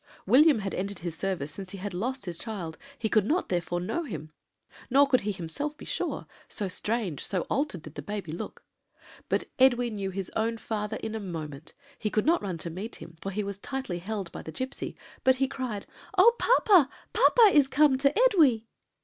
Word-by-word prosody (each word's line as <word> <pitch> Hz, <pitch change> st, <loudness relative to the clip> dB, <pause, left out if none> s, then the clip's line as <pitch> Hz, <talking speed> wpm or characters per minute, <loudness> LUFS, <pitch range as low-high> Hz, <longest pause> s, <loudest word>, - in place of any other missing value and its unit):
William 280 Hz, +7 st, +6 dB
had 195 Hz, -1 st, -3 dB
entered 200 Hz, +1 st, -3 dB
his 170 Hz, -2 st, -4 dB
service 180 Hz, -6 st, -2 dB
since 190 Hz, +3 st, -8 dB
he 195 Hz, -, -7 dB
had 195 Hz, 0 st, -5 dB
lost 250 Hz, +6 st, -3 dB
his 175 Hz, -2 st, -4 dB
child; 185 Hz, -8 st, -5 dB, 0.2 s
he 225 Hz, -, -1 dB
could 215 Hz, -1 st, +3 dB
not 320 Hz, -, 0 dB
therefore 175 Hz, -1 st, -1 dB
know 185 Hz, -, -2 dB
him; 155 Hz, -, -6 dB, 0.6 s
nor 275 Hz, +3 st, +6 dB
could 255 Hz, -2 st, +3 dB
he 210 Hz, -, -1 dB
himself 200 Hz, -, -4 dB
be -, -, -10 dB
sure -, -, -2 dB, 0.2 s
so 205 Hz, -, -2 dB
strange, 205 Hz, -, -2 dB
so 185 Hz, -3 st, -1 dB
altered, 275 Hz, -, -1 dB
did 155 Hz, -, -10 dB
the -, -, -6 dB
baby 205 Hz, -6 st, -5 dB
look. 170 Hz, -, -7 dB, 0.7 s
"But -, -, +1 dB, 0.2 s
Edwy 245 Hz, -2 st, +4 dB
knew 200 Hz, -2 st, -3 dB
his 190 Hz, -1 st, -5 dB
own 225 Hz, +1 st, 0 dB
father 215 Hz, -1 st, -3 dB
in 220 Hz, -, -3 dB
a 220 Hz, -, -2 dB
moment; 160 Hz, -6 st, -7 dB, 0.2 s
he 210 Hz, -, -1 dB
could 215 Hz, -, +1 dB
not 335 Hz, +3 st, +4 dB
run 185 Hz, -4 st, -3 dB
to 165 Hz, +1 st, -5 dB
meet 200 Hz, +7 st, -5 dB
him, 165 Hz, +1 st, -11 dB
for 195 Hz, -, -3 dB
he 205 Hz, +2 st, -2 dB
was 200 Hz, 0 st, -5 dB
tightly 260 Hz, -8 st, -4 dB
held 195 Hz, -1 st, -4 dB
by -, -, -7 dB
the 160 Hz, -, -8 dB
gipsy, 260 Hz, -, -4 dB, 0.3 s
but 260 Hz, 0 st, +5 dB
he 270 Hz, +1 st, +1 dB
cried: 245 Hz, -7 st, -4 dB, 0.3 s
"'Oh, 470 Hz, 0 st, +7 dB
papa! 390 Hz, -, +5 dB, 0.2 s
papa 450 Hz, -4 st, +6 dB
is 290 Hz, -3 st, +6 dB
come 280 Hz, -1 st, +4 dB
to 275 Hz, 0 st, +4 dB
Edwy!' 300 Hz, -, +5 dB
210 Hz, 205 wpm, -28 LUFS, 180-265 Hz, 0.7 s, Oh